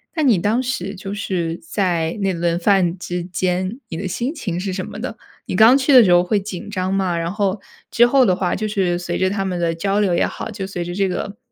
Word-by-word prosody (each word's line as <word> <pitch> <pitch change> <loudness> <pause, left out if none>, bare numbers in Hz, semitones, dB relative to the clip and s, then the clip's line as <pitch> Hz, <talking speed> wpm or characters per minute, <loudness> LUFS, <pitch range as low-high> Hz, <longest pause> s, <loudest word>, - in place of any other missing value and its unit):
那 315 - 0
你 235 -8 +4
当 215 +8 +1
时 205 -6 -3
就 195 +1 -6
是 175 -5 -2
在 170 -2 -1
那 195 -1 +1
轮 170 0 0
饭 185 -1 +2
之 175 0 -4
间， 185 +5 -2
你 165 - -5
的 190 +2 -3
心 240 - -2
情 185 - -4
是 190 0 -3
什 185 -1 -3
么 210 - -8
的？ 225 -2 -5 0.3
你 - - -4
刚 225 +6 +7
去 275 +1 +2
的 250 -3 +9
时 180 - +3
候 175 0 +6
会 205 +3 +1
紧 195 -1 -7
张 190 -1 -2
吗？ 185 -3 0
然 170 +1 -2
后 200 -1 -1 0.3
之 240 +1 +5
后 265 0 +4
的 185 -4 +3
话， 180 -1 -1
就 215 +1 -2
是 185 -4 0
随 175 -1 -3
着 185 0 +1
他 195 -1 -2
们 180 -2 -2
的 165 -1 0
交 195 +4 0
流 190 -4 +2
也 - - +2
好， - - -5
就 195 -2 -5
随 175 -3 -4
着 175 +1 -5
这 195 0 +1
个 200 +3 -4
190 Hz, 270 characters per minute, -20 LUFS, 175-210 Hz, 0.3 s, 的